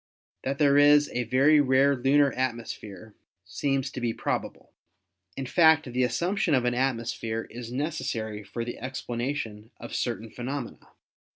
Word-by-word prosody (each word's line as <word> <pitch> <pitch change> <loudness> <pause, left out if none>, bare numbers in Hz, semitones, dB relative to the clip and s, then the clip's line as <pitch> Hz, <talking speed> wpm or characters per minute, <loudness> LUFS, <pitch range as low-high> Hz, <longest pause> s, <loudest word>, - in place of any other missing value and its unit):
That 135 +1 -2
there 145 -1 +4
is 145 0 +5
a 125 0 -1
very 140 +6 +4
rare 135 +1 +3
lunar 135 +2 +3
atmosphere 110 -5 -5 0.3
seems 135 -2 -1
to 125 - -6
be 115 -2 -1
probable. - - -4 0.6
In 135 - -3
fact, 160 +3 +5
the 125 - +1
assump 170 - 0
tion 155 - +3
of 125 -2 +1
an 120 - +1
atmosphere 115 -3 -2
is 120 0 -8
necessary 120 -7 -3
for 115 +3 -5
the 120 - -6
explanation 120 -3 -4
of - - -9
certain 115 -2 -3
phenomena. 125 +1 -6
130 Hz, 150 wpm, -27 LUFS, 115-140 Hz, 0.6 s, is